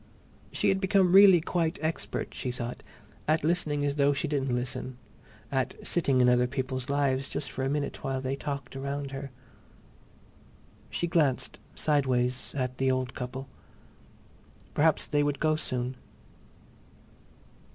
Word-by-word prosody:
She - - +1
had 190 0 +1
become 190 -2 +3
really 195 -2 +9
quite 170 +1 0
expert, 160 +1 -3
she 130 - -4
thought, 120 0 -5 0.5
at 155 0 +2
listening 155 -3 +1
as 140 0 -1
though 140 0 +4
she 155 - -2
didn't 135 -4 0
listen, 125 +1 -3 0.5
at 130 -2 0
sitting 140 -7 +2
in 125 - +5
other 125 0 +4
people's 130 0 -3
lives 135 -2 +1
just 140 -3 -3
for 130 - -3
a 135 - 0
minute 145 0 -2
while 135 -1 -1
they 130 +1 -2
talked 140 -2 -5
round 140 +1 -4
her. 135 0 -5 1.6
She - - -1
glanced, 155 -6 +1 0.2
sideways, 130 -4 +1
at 130 -2 -2
the 135 0 +2
old 130 -2 0
couple. 130 +2 -5 1.3
Perhaps 155 +1 +3
they 145 -1 +1
would 145 -1 0
go 155 -1 +2
soon. 130 -4 -2
140 Hz, 140 wpm, -29 LUFS, 130-150 Hz, 1.6 s, really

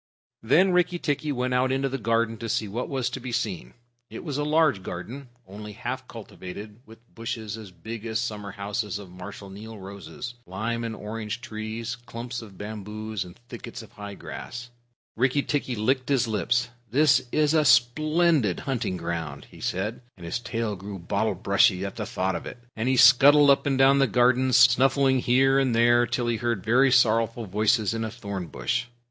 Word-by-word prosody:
Then 165 +12 +4
Rikki 180 0 +2
tikki 150 -2 -1
went 125 -1 -1
out 130 +1 +2
into 135 +1 +1
the 135 0 -3
garden 115 0 +1
to 115 +1 -5
see 110 0 0
what 115 +5 -4
was 130 -3 -1
to - - -5
be 125 0 -6
seen. 105 - -3 0.3
It - - -8
was 145 -4 -3
a - - 0
large 150 -7 +3
garden, 120 +10 -7 0.2
only 105 +2 -9
half 125 +4 -5
cultivated, 105 -1 -9
with 110 +1 -13 0.2
bushes, 110 -2 -5
as 110 -3 -9
big 110 +5 -8
as 110 0 -1
summer 105 -3 -4
houses, 105 0 -3
of 100 -3 -11
Marshal 95 +2 -9
Niel 110 +3 -9
roses, 100 +5 -8
lime 110 +6 -3
and 115 -1 -4
orange 110 +2 -5
trees, 110 +1 -5
clumps 120 0 -6
of 100 -4 -13
bamboos, 105 0 -5
and 90 -1 -13
thickets 120 -1 -8
of 110 - -15
high 105 -3 -8
grass. 120 +4 -8 0.4
Rikki 130 +4 +2
tikki 140 -4 -1
licked 125 +5 0
his 135 -4 +2
lips. 120 +3 0 0.2
"This 130 0 +3
is 150 0 +2
a 155 -1 +4
splendid 145 - +3
hunting 120 -9 -2
ground," 85 -4 -4
he - - -14
said, 100 +6 -2 0.2
and 85 - -10
his 85 +8 -2
tail 115 -3 -3
grew 100 +1 -7
bottle 85 -1 -1
brushy 95 +1 +3
at 100 - -6
the 105 -2 -4
thought 95 -5 -1
of - - -5
it, - - -8 0.2
and 115 +3 -1
he 130 - +2
scuttled 140 +4 +7
up 140 - +2
and 135 -2 +1
down 135 +1 +5
the 135 - +4
garden, 125 +1 +3
snuffing 130 +2 +5
here 135 +2 +3
and 130 -4 +1
there 120 +1 +4
till 120 +1 -1
he 120 -1 0
heard 115 -4 -1
very 130 +4 +4
sorrowful 115 -1 +3
voices 105 +2 +1
in 115 0 -2
a 110 - -2
thorn 100 -6 -6
bush. 100 - -2
115 Hz, 190 wpm, -26 LUFS, 105-130 Hz, 0.4 s, scuttled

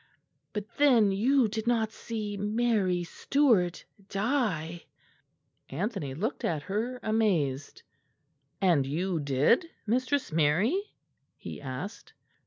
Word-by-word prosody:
But 210 -1 -4
then 245 -8 +5
you 245 +5 +3
did 220 +1 -4
not 225 -2 +2
see 215 -2 -5
Mary 205 -3 +1
Stuart 205 - +1 0.2
die." 195 - -1 0.8
Anthony 165 - -3
looked 215 - -3
at 155 -3 -1
her, 225 +7 -2
amazed. 170 -11 0 0.8
"And 165 -8 +3
you 170 +4 -1
did, 145 - +2 0.2
Mistress 255 +3 0
Mary?" 185 - +1 0.4
he - - -8
asked. 180 - -7
205 Hz, 100 wpm, -29 LUFS, 165-235 Hz, 0.8 s, then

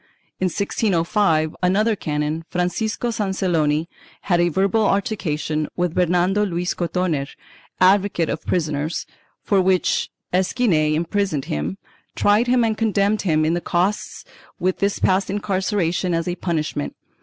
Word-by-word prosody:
In 185 - +1
1605, 180 -3 +1
another 210 +5 +2
canon, 150 -1 -2
Francisco 215 +6 -1
Sanceloni, 175 -7 0 0.3
had 175 -3 +2
a 175 - +3
verbal 195 +6 +2
altercation 155 -8 -1
with 175 -2 -1
Bernardo 180 +3 +2
Luis 180 -2 -1
Cotoner, 170 -5 -1 0.5
advocate 190 -2 +3
of 155 - -3
prisoners, 155 -2 -1 0.4
for 195 -2 +3
which 185 -1 +1 0.2
Esquinel 180 -5 +2
imprisoned 170 -2 -1
him, 80 +6 -3 0.4
tried 210 +4 +3
him 245 -1 +3
and 220 -1 0
condemned 210 -1 +1
him 155 -4 +2
in 160 - +1
the 175 - -1
costs, 185 +5 -1 0.3
with 185 +1 0
his 200 0 +1
past 190 +1 +1
incarceration 190 -3 0
as 165 +1 -1
a 175 - 0
punishment. 155 - -2
180 Hz, 130 wpm, -21 LUFS, 160-200 Hz, 0.5 s, a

